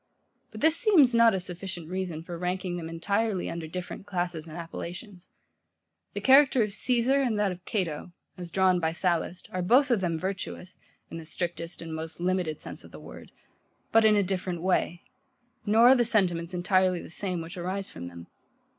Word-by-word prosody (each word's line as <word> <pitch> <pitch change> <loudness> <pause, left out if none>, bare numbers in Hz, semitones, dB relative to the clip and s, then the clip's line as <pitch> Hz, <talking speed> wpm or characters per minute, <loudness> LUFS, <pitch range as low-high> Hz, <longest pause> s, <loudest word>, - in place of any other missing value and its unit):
But - - -10
this 320 +1 +5
seems 340 - +5
not 230 -3 +5
a - - 0
sufficient 180 -1 -6
reason 180 -3 -4
for 175 0 -7
ranking 180 +1 -2
them 165 -2 -5
entirely 200 +4 -1
under 170 -1 -5
different 180 +4 -7
classes 175 -4 -3
and 160 +1 -9
appellations. 175 +3 -8 0.9
The - - -3
character 265 -2 +6
of 210 -2 -3
Caesar 255 +4 +2
and 240 -5 0
that 205 -2 +1
of 180 0 -9
Cato, 175 -5 -3 0.2
as 180 -2 -8
drawn 185 0 +3
by 160 -1 0
Sallust, 175 0 -1
are 185 - -2
both 255 +9 +4
of 225 -5 +2
them 170 -3 0
virtuous, 185 0 -5 0.3
in - - -6
the 165 - -8
strictest 170 0 -5
and 165 -1 -7
most 160 +1 -6
limited 180 -3 -1
sense - - -9
of - - -13
the - - -11
word; - - -12 0.6
but 225 0 +5
in 215 -1 +5
a 205 - +3
different 180 -2 -3
way: 180 -2 0 0.6
nor 225 +4 +6
are 265 - +8
the 245 - +3
sentiments 180 -6 +1
entirely 185 0 +2
the - - -10
same 180 -1 -2
which 165 +3 -7
arise 185 +2 -3
from 85 +1 -8
them. 85 -1 -10
185 Hz, 190 wpm, -28 LUFS, 170-205 Hz, 0.9 s, are